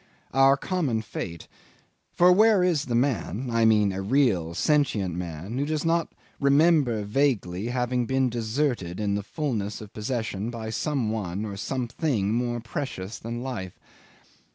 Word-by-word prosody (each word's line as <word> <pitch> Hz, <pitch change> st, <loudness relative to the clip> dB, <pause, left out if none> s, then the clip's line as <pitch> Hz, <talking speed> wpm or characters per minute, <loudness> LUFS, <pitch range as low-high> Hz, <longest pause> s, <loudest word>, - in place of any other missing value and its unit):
Our 135 Hz, +1 st, +5 dB
common 140 Hz, -10 st, -1 dB
fate... 85 Hz, -5 st, -6 dB, 0.6 s
for 180 Hz, +1 st, +5 dB
where 210 Hz, 0 st, +5 dB
is 170 Hz, -5 st, +1 dB
the 120 Hz, -, -1 dB
man 120 Hz, -, 0 dB
I 115 Hz, -1 st, +3 dB
mean 105 Hz, -3 st, +4 dB
a 95 Hz, -, -3 dB
real 100 Hz, -, +1 dB
sentient 110 Hz, -, +1 dB
man 90 Hz, -, -5 dB
who 140 Hz, -, +1 dB
does 155 Hz, 0 st, -1 dB
not 165 Hz, 0 st, +2 dB, 0.3 s
remember 140 Hz, -5 st, +3 dB
vaguely 105 Hz, -5 st, 0 dB
having 125 Hz, 0 st, -1 dB
been 130 Hz, +1 st, +2 dB
deserted 115 Hz, -, -1 dB
in 105 Hz, -1 st, 0 dB
the 100 Hz, -, 0 dB
fullness 105 Hz, -4 st, -3 dB
of 105 Hz, -2 st, -11 dB
possession 110 Hz, -2 st, -3 dB
by 115 Hz, -2 st, -5 dB
some 130 Hz, -3 st, -1 dB
one 100 Hz, -2 st, -3 dB
or 100 Hz, -2 st, -5 dB
something 120 Hz, -1 st, -1 dB
more 120 Hz, 0 st, -1 dB
precious 115 Hz, -4 st, -5 dB
than 120 Hz, +2 st, -5 dB
life? 110 Hz, -9 st, -5 dB
120 Hz, 150 wpm, -26 LUFS, 105-140 Hz, 0.6 s, Our